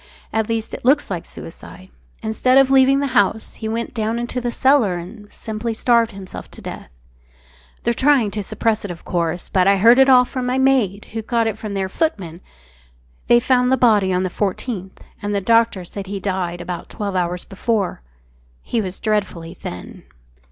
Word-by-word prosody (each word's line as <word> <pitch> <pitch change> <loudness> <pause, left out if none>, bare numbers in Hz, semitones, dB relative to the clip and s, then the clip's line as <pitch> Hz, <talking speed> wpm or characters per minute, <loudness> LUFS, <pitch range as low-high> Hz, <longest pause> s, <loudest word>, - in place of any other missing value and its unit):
At 220 0 0
least, 225 -1 -2
it - - -6
looks 275 -1 +3
like 175 -3 -4
suicide. 185 +3 -11 0.3
Instead 240 +4 +2
of 270 -1 +5
leaving 270 +1 +5
the - - 0
house, 220 -1 +2
he 220 - -5
went 230 +2 -3
down 225 -1 -1
into 240 +1 -3
the 240 - -1
cellar 260 -6 +3
and 205 +4 -10
simply 220 +1 -4
starved 235 0 +3
himself 195 -3 -9
to - - -11
death.... - - -8 0.9
They're 235 - +1
trying 260 -4 +3
to 210 - -3
suppress 220 +2 -1
it, 205 - -5
of 175 -1 -8
course, 170 0 -2
but 185 -1 +2
I 200 0 +5
heard 230 +6 +6
it 265 0 +6
all 250 -1 +7
from 250 0 -4
my 250 +1 0
maid, 255 -7 +1
who 225 - -2
got 230 +1 0
it 220 -2 -1
from 210 -2 -5
their 190 -1 -1
footman.... 190 - -2 0.9
They 240 - +6
found 250 0 +2
the 265 - +4
body 210 -6 +4
on 180 0 +1
the 185 - -2
14th 195 -1 -3 0.3
and 205 0 -2
the - - +2
doctor 225 -2 +2
said 195 +2 -7
he 200 - -5
had 195 - -6
died 180 -3 -2
about 175 -1 -6
twelve 200 -2 -4
hours 180 0 -1
before.... 200 - -2 0.6
He 230 - -1
was 190 -2 -5
dreadfully 200 -6 -2
thin. 90 - -9
215 Hz, 195 wpm, -20 LUFS, 190-240 Hz, 0.9 s, all